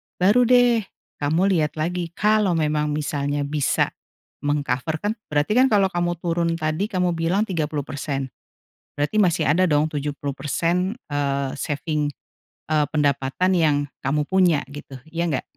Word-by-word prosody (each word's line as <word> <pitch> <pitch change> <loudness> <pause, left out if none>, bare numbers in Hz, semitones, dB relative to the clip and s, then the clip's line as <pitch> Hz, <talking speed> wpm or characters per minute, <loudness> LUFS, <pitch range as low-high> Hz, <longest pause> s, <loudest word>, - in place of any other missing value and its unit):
baru 215 +7 +4
deh 245 -1 +5 0.4
kamu 160 +7 +2
lihat 155 -5 +1
lagi. 170 +2 -2
Kalau 210 -3 +2
memang 150 -1 0
misalnya 145 -1 -1
bisa 145 -1 0 0.5
meng-cover, 145 +2 -1
kan 205 - +1 0.2
berarti 150 +4 0 0.2
kalau 200 -5 +3
kamu 175 -1 0
turun, 170 0 0
tadi 155 +4 -1
kamu 180 -4 0
bilang 170 +5 +1
30% 145 - -3 0.6
berarti 145 +8 -1
masih 180 -9 +3
ada 170 +5 +4
dong 150 -3 +2
70% 150 +5 -2 0.2
eee, 140 -2 -1
saving, 150 0 -2 0.6
eee, 150 -1 +3
pendapatan 145 +4 +1
yang 155 -3 +3 0.2
kamu 145 +3 0
punya 180 -6 +3
gitu, 140 -1 -10 0.2
ya 170 +1 -1
nggak? 145 -6 -1
155 Hz, 130 wpm, -23 LUFS, 145-180 Hz, 0.6 s, deh